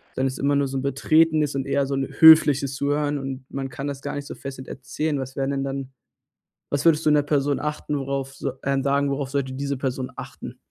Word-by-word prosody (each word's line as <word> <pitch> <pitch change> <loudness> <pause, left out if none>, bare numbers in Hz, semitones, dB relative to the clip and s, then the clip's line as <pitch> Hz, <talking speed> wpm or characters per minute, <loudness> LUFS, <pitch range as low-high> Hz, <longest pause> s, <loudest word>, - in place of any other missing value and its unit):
dann 130 +1 +1
ist 130 0 -4
immer 140 +1 +2
nur 140 -1 +1
so 135 0 -4
'n - - -2
betretenes 150 +2 +2
und 135 -1 -2
eher 140 0 +1
so 135 - -3
'n 135 -1 -1
höfliches 145 -4 +7
Zuhören 145 +1 0
und 135 -1 -6
man 135 -1 -4
kann 140 +1 -6
das 140 -1 -5
gar 145 - -4
nicht 145 0 -5
so - - -7
fesselnd 135 -1 -8
erzählen.“ 150 +3 -3
Was 130 0 -6
wären 135 0 0
denn 135 -1 -1
dann 135 -1 -5 0.8
was 145 +2 -1
würdest 160 -1 +4
du 155 - +4
'ner 150 -1 +4
Person 145 -1 0
achten, 150 -1 -3
worauf 135 0 -3
s 135 - -8 0.2
ähm, 135 0 +1
sagen, 140 +1 +1
worauf 140 -1 -2
sollte 135 -2 -2
diese 140 +1 -3
Person 130 -1 -3
achten? - - -9
140 Hz, 230 wpm, -24 LUFS, 135-145 Hz, 0.8 s, höfliches